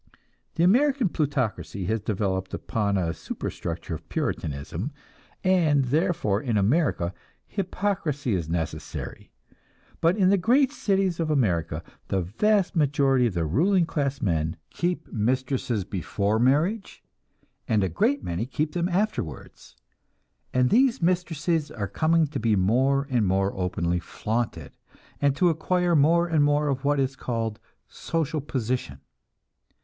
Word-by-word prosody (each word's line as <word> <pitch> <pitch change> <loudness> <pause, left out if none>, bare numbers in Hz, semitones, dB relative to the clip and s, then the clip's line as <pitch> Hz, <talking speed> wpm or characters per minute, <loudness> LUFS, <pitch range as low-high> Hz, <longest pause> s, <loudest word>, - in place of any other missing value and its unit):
The 165 - +2
American 255 +3 +4
plutocracy 130 - -2
has 110 +3 -1
developed 95 -3 -2
upon 100 -3 -1
a 85 -3 0
superstructure 85 +1 -5
of 80 - -8
Puritanism, 80 - -3 0.5
and 165 -7 +3
therefore, 145 - +1
in 120 -5 0
America, 105 - +1 0.3
hypocrisy 180 - -2
is 85 -4 -2
necessary. 80 -2 -4 0.7
But 170 +5 +3
in 190 -2 +4
the 200 - +4
great 255 +8 +3
cities 195 - 0
of 165 -2 0
America, 85 - 0 0.2
the 95 - 0
vast 195 - +1
majority 135 -4 +3
of 100 - -4
the 85 -1 0
ruling 170 - +3
class 140 -4 -2
men 80 -4 0 0.2
keep 175 +1 -2
mistresses 125 -1 0
before 100 +3 -1
marriage, 155 - +1 0.6
and 105 -3 +2
a - - +2
great 95 - +1
many 90 +6 -3
keep 150 +3 -1
them 175 0 0
afterwards; 180 - -3 0.8
and 125 0 +2
these 260 +1 +4
mistresses 165 -3 0
are 105 -9 -4
coming 160 - +2
to 145 -2 -4
be 110 -1 +2
more 130 +9 +2
and 115 -5 +2
more 95 +1 +1
openly 90 -1 -1
flaunted, 110 +6 -3 0.5
and 140 -1 +3
to 175 +5 +3
acquire 175 +2 +1
more 165 +4 +4
and 160 -3 +3
more 145 0 +2
of 135 0 -2
what 145 0 +2
is 135 0 0
called 115 -4 -3 0.3
"social 160 -2 -2
position." 125 - -3
135 Hz, 135 wpm, -26 LUFS, 100-170 Hz, 0.8 s, American